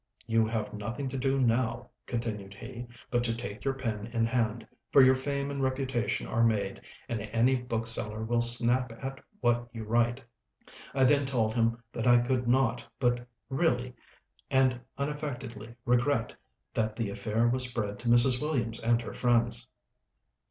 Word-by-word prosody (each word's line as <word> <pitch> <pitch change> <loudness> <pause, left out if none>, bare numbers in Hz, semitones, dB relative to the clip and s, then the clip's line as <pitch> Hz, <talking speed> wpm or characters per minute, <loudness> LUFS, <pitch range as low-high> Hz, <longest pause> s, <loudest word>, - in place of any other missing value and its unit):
"You 115 0 +2
have 110 -2 -3
nothing 120 +6 -4
to 135 - -4
do 135 +1 +1
now," 120 0 0 0.2
continued 105 -5 -4
he, 120 +2 -8 0.2
"but 120 -1 +2
to 115 -1 +1
take 105 -3 -6
your 135 -1 0
pen 110 -5 -3
in 115 -1 0
hand; 115 -1 0 0.3
for 135 - +8
your 130 0 +7
fame 140 +1 -2
and 140 -1 -3
reputation 130 -4 -1
are 115 - +1
made, 100 -4 0 0.3
and 115 -3 -3
any 115 +5 +2
bookseller 115 -3 -1
will 120 +1 +1
snap 120 +1 +3
at 135 +3 -7 0.2
what 120 -1 +1
you 115 -2 -6
write." 120 +3 +1 0.7
I 135 - +3
then 140 +1 +4
told 115 -5 +1
him 115 0 +1
that 115 - -2
I 120 0 +7
could 120 0 0
not 125 -1 +2 0.2
but 120 -1 +1 0.2
really 125 -3 0 0.6
and 130 -2 +3 0.2
unaffectedly 130 -6 -5
regret 120 0 +2 0.4
that 110 -1 -1
the 110 -4 -2
affair 105 +3 0
was 125 +1 +2
spread 105 -4 -3
to 120 - -6
Mrs. 120 +1 +6
Williams 120 -7 -1
and 115 0 +2
her - - -7
friends. 120 0 +1
120 Hz, 160 wpm, -29 LUFS, 115-130 Hz, 0.7 s, for